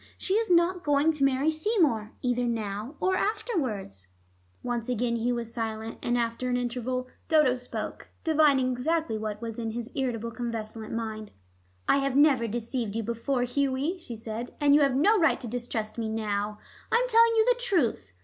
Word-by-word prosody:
She 380 - -1
is 445 +1 +1
not 350 +1 +3
going 290 +2 +3
to 300 -3 -2
marry 275 +3 +3
Seymour, 310 - +1
either 245 -1 +1
now 220 +2 -3
or 375 0 +2
afterwards." 260 - -2 0.6
Once 240 -1 -2
again 240 -1 0
Hugh 240 +2 0
was 230 -1 -5
silent, 225 -1 -4
and 240 0 0
after 235 +1 -1
an 245 - +1
interval 250 +1 -2 0.2
Dodo 300 -5 +4
spoke, 250 -1 -6
divining 295 -5 +4
exactly 310 +1 0
what 215 0 -4
was 230 0 -5
in 225 -1 -3
his 240 +2 -5
irritable 235 -4 -2
convalescent 225 -2 -5
mind. 220 -2 -4 0.6
"I - - +5
have 275 -1 0
never 275 -5 +5
deceived 230 -1 -3
you 230 - -1
before, 235 +3 -1
Hughie," 280 +7 0
she 240 -8 -7
said, 225 +2 -6
"and 290 -1 +4
you 295 - +6
have 275 -2 +3
no 405 +10 +4
right 320 - +3
to 245 - -6
distrust 230 -2 -4
me 225 -1 -2
now. 210 -1 -2 0.3
I - - +3
am - - +3
telling 460 -1 +5
you 440 -1 +4
the - - +3
truth. 350 - 0
245 Hz, 180 wpm, -28 LUFS, 225-300 Hz, 0.6 s, you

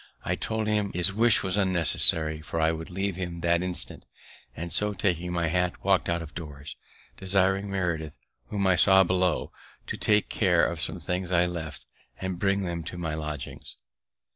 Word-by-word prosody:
I - - 0
told 110 -1 -3
him 105 -2 0
his 90 +2 +3
wish 115 +2 +4
was 95 +1 -1
unnecessary, 80 -4 +5
for 80 +2 -5
I 80 0 +2
would 80 0 -6
leave 95 0 -3
him 85 -2 -5
that 85 +1 +1
instant; 90 -1 -3 0.5
and 85 +2 -6
so, 105 0 +2
taking 90 -3 -1
my 85 -1 -1
hat, 90 +1 -1
walk'd 95 -2 +1
out 85 0 -1
of 80 - -12
doors, 75 -4 -9 0.4
desiring 95 +1 +1
Meredith, 85 -6 -3 0.3
whom 100 -2 -2
I 95 -1 +4
saw 95 +2 +6
below, 90 -1 0 0.3
to - - -5
take 105 0 +2
care 90 -5 +2
of 85 -2 -3
some - - -3
things 90 0 -3
I 90 -1 +3
left, 85 -3 -6 0.3
and 95 -2 -4
bring 100 0 +1
them 85 -2 -4
to 90 - -7
my 80 -3 -4
lodgings. 75 -2 -7
90 Hz, 180 wpm, -26 LUFS, 85-95 Hz, 0.5 s, saw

